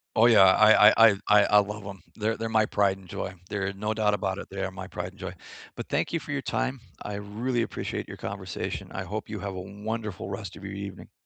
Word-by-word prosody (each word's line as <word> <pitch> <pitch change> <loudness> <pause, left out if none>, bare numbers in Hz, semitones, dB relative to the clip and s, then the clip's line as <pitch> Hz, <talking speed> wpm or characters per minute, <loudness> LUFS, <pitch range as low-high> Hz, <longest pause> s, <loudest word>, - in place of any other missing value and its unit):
Oh, 110 - +6
yeah, 115 -4 +7
I 105 +2 +7
I 115 +1 +7
I 100 - 0
I 105 -1 +7
I 105 - +4
love 105 0 -3
'em, 100 -3 -8
they're 110 +1 -1
they're 115 0 -4
my 110 -1 +3
pride 100 -2 +1
and 95 -1 -15
joy, 95 +2 -5 0.2
there 95 -1 -2
no 105 +2 -2
doubt 105 -1 +2
about 95 -1 -1
it, - - -9
they 95 0 -5
are 95 - -1
my 95 -1 -8
pride 90 0 -5
and 100 - -21
joy. 95 -1 -5 0.4
But - - -6
thank - - -1
you 170 - 0
for 145 - -6
your 140 - -1
time, 130 -1 -2 0.2
I 105 - -5
really 115 +5 -2
appreciate - - -4
your - - -8
conversation, - - -5
I - - -4
hope - - -5
you - - -5
have 100 -2 -5
a 90 - -4
wonderful 105 0 -5
rest 100 0 -6
of 100 - -10
your 100 - -6
evening. 100 0 -8
105 Hz, 250 wpm, -27 LUFS, 95-110 Hz, 0.4 s, yeah